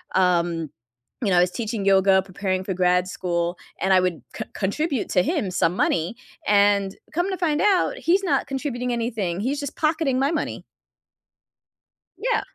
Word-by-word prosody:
um, 170 -3 +2 0.5
you 205 - +1
know, 180 - +4
I 175 - +7
was 180 - +2
teaching 220 -1 -3
yoga, 195 0 +5
preparing 185 0 -3
for 190 0 -3
grad 180 0 +2
school, 175 -1 -2 0.2
and 190 - +1
I 185 - +6
would 180 -3 -1
co - - -5
contribute 265 - -1
to 180 - +3
him 210 - -1
some 175 -1 +1
money, 170 +3 0 0.3
and 200 -1 +3 0.2
come 350 +4 0
to 380 - -2
find 315 -4 +1
out, 410 +4 +2
he's 380 -3 +2
not 365 - +1
contributing 265 -3 -3
anything, 220 -7 -2
he's 265 +7 -1
just 285 -2 -5
pocketing 305 -4 +1
my 275 +3 +2
money. 325 - -3 1.5
Yeah. 460 +4 0
200 Hz, 165 wpm, -23 LUFS, 180-285 Hz, 1.5 s, I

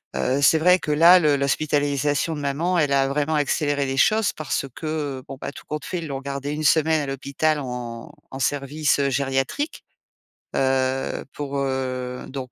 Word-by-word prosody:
heu, 135 +2 0
c'est 160 +3 +5
vrai 180 +2 +5
que 150 - -3
là, 170 +5 +7
le 150 -4 +3
l'hospitalisation 145 +2 0
de 150 - -5
maman, 165 +6 0
elle 145 -2 +2
a 135 0 +3
vraiment 150 +2 0
accéléré 145 -1 0
les 135 0 -3
choses 215 +6 +3
parce 155 -2 -2
que, 150 -4 -3
bon, 135 - -8
bah, - - -4
tout - - -13
compte 150 -1 -4
fait, 180 +4 -3
ils 165 - -6
l'ont 135 -1 -4
gardé 140 +1 -4
1 155 +1 -3
semaine 160 +1 +3
à - - -3
l'hôpital 140 +3 -1
en 120 -3 -6 0.2
en 135 - -7
service, 145 +3 0
heu, 140 -1 +2
gériatrique, 135 - -2 0.7
heu, 130 0 0
pour, 140 -1 -4
heu, 130 -2 -3
donc 130 -2 -6
140 Hz, 180 wpm, -23 LUFS, 135-155 Hz, 0.7 s, là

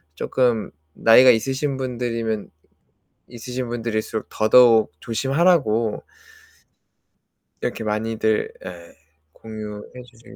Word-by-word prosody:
쪼끔 120 -1 -1 0.2
나이가 125 +3 +6
있으신 135 +4 +1
분들이면, 115 -4 -3 0.8
있으신 125 +1 -6
분들일수록 110 -2 -4
더더욱 115 0 +4
조심하라고. 130 - +1 1.6
이렇게 - - -3
많이들 110 0 -1
예 85 -2 -10 0.4
공유해 110 +2 -9
주실 120 0 -17
115 Hz, 230 characters per minute, -21 LUFS, 110-125 Hz, 1.6 s, 나이가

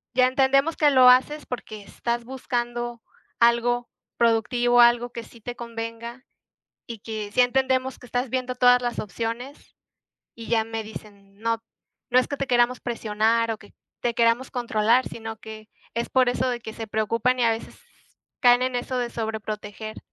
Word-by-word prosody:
ya 255 0 +5
entendemos 275 +4 +2
que 295 - +5
lo 255 -2 +7
haces 280 +4 +3
porque 220 -4 -7
estás 235 +3 -3
buscando 240 -2 -3 0.4
algo 235 +1 +2 0.3
productivo, 240 +1 +2
algo 240 0 +4
que 235 -1 -7
sí 235 - -17
te 245 +2 -6
convenga 235 +1 -7 0.6
y 230 -3 -7
que 215 -1 -6
sí 250 - +5
entendemos 260 +1 +1
que - - -13
estás 245 +1 -2
viendo 255 0 -2
todas 245 0 +5
las 240 -1 -2
opciones" 230 +7 -6 0.6
y 230 - -9
ya 225 -2 +2
me 225 0 -4
dicen: 200 -2 -12
"No, 230 +1 -1 0.5
no 250 - +5
es 255 - +2
que 285 - -3
te 275 - -2
queramos 245 0 +2
presionar 230 0 0
o 220 - -6
que 205 - -17 0.3
te 240 -1 0
queramos 230 +2 +2
controlar", 240 0 +2
sino 225 -1 -7
que 220 0 -11 0.3
es 235 +1 -2
por 255 -1 +3
eso 255 +1 0
de 240 -1 -3
que 220 - -8
se 225 - -6
preocupan 230 +4 0
y - - +3
a 230 - +4
veces 225 0 -5 0.6
caen 245 -1 +5
en 255 -1 0
eso 250 +1 -3
de 240 -1 -2
sobreproteger. 215 -1 -5
235 Hz, 175 wpm, -24 LUFS, 225-250 Hz, 0.6 s, lo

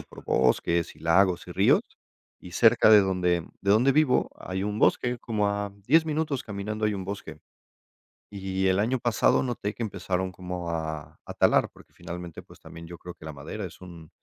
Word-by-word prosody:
por - - -13
bosques 80 +6 +1
y - - -18
lagos 90 +2 +2
y - - -8
ríos, - - +4 0.6
y - - -12
cerca - - +5
de 110 -1 +9
donde 90 -3 0 0.2
de 100 - 0
donde 120 +7 +4
vivo 150 -3 +2
hay 95 +1 -5
un 105 +1 -3
bosque, 125 -1 +2
como 105 -3 -1
a 100 0 -2 0.2
10 160 +4 +4
minutos 155 -3 -1
caminando 105 +1 -3
hay 105 - 0
un 95 -2 -5
bosque 100 +1 -7 0.9
y 95 -1 -3
el 95 +1 +2
año 120 +5 +1
pasado 120 +1 +2
noté 120 -5 -3
que 120 - -4
empezaron 95 -3 -3
como 90 -2 -5
a 80 -2 -5
a - - -8
talar, - - +3
porque - - -20
finalmente, 85 -1 -8
pues, - - -18
también 85 0 -11
yo 85 +1 -9
creo 90 +1 -9
que 80 - -15
la 80 - -6
madera 75 +9 -7
es 90 - -11
un 85 -4 -12
95 Hz, 195 wpm, -26 LUFS, 85-110 Hz, 0.9 s, de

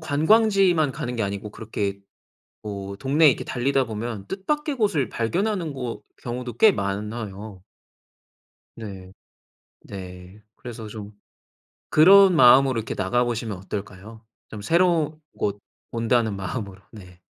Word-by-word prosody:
관광지만 175 - +3
가는 125 0 -5
게 110 - -1
아니고 100 +1 -4
그렇게 100 -2 -4 0.6
뭐 100 -2 -6
동네에 140 +7 +4
이렇게 - - -1
달리다 130 +1 0
보면 110 -2 -6
뜻밖의 295 +10 -2
곳을 175 - 0
발견하는 175 - -1
거 125 -3 -5 0.2
경우도 125 0 -5
꽤 220 - +7
많아요. 105 - -5 1.2
네. 95 -4 -9 0.7
네. 90 +1 -10
그래서 115 -3 -9
좀 105 -1 -9 0.8
그런 190 +3 +7
마음으로 130 -2 +6
이렇게 110 - -5
나가 120 +6 0
보시면 115 -4 -3
어떨까요? 100 +3 -8 0.2
좀 105 -2 -9
새로운 165 - +1 0.2
곳 100 0 -2 0.3
온다는 115 -2 +1
마음으로. 95 0 -6
네. 90 -4 -14
115 Hz, 275 characters per minute, -24 LUFS, 100-150 Hz, 1.2 s, 꽤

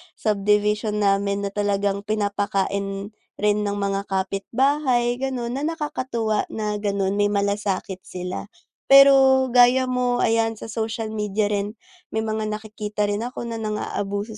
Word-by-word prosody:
subdivision 210 +1 +1
namin 200 0 +1
na 200 - -2
talagang 200 0 -1
pinapakain 200 -1 -1 0.2
rin 210 0 +1
ng 200 - -1
mga 200 0 -2
kapitbahay 240 +6 0
ganon 260 -1 -3
na 295 - -1
nakakatuwa 255 -9 -2
na 210 -1 -3
ganun 200 -1 -1
may 205 - +4
malasakit 200 -2 -1
sila. 180 +1 -6 0.4
Pero 270 -1 +7
gaya 250 +1 +5
mo 250 -1 0
ayan 225 0 +2
sa 225 - -9
social 225 0 -3
media 210 -1 -1
rin, 205 0 -2 0.4
may 220 - 0
mga 220 0 -2
nakikita 210 -1 -3
rin 205 +3 -2
ako 250 - -6
na 235 -1 -4
nang 215 -1 -3
aabuso 205 +2 -4
210 Hz, 140 wpm, -23 LUFS, 200-235 Hz, 0.4 s, Pero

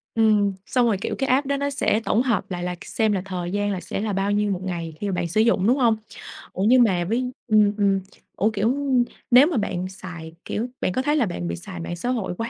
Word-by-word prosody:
Ừm, 210 -3 +3
xong 250 -2 +2
rồi, 220 -4 +2
kiểu, - - -2
cái 270 -2 -1
app 270 +2 +2
đó 280 0 0
nó 280 0 -1
sẽ 260 -5 +1
tổng 230 - +2
hợp 235 -6 -1
lại 175 -1 -3
là 180 0 -2
k 175 - -13
xem 220 -1 0
là 195 -3 0
thời 180 -2 -4
gian 205 0 0
là 190 - -2
sẽ - - -4
là 215 -2 -2
bao 195 +1 0
nhiêu 205 0 +1
1 180 - -2
ngày 170 -3 -4
khi 205 - -3
mà - - -2
bạn 175 -1 -1
sử 205 +6 +2
dụng, 220 -3 +3
đúng 255 +4 +4
hông? 230 -4 +3 0.6
Ủa, 190 - -2
nhưng 245 +3 +6
mà 185 -6 +2
với 250 +6 -1 0.2
ừm, 210 -2 +4
ừm, 195 -1 +2 0.4
ủa, 215 - +2
kiểu, 220 +5 +1 0.6
nếu 255 +4 +8
mà 325 -7 -1
bạn 185 -3 -2
xài, 175 -4 -9
kiểu, 230 +4 -2
bạn - - +1
có 255 - 0
thấy 295 +2 +1
là 275 - +3
bạn 85 - -4
bị 85 - -2
xài 85 0 -9
mạng 130 - -4
xã 245 +9 -3
hội 225 -8 -1
quá 230 +1 -3
205 Hz, 270 wpm, -23 LUFS, 185-240 Hz, 0.6 s, nếu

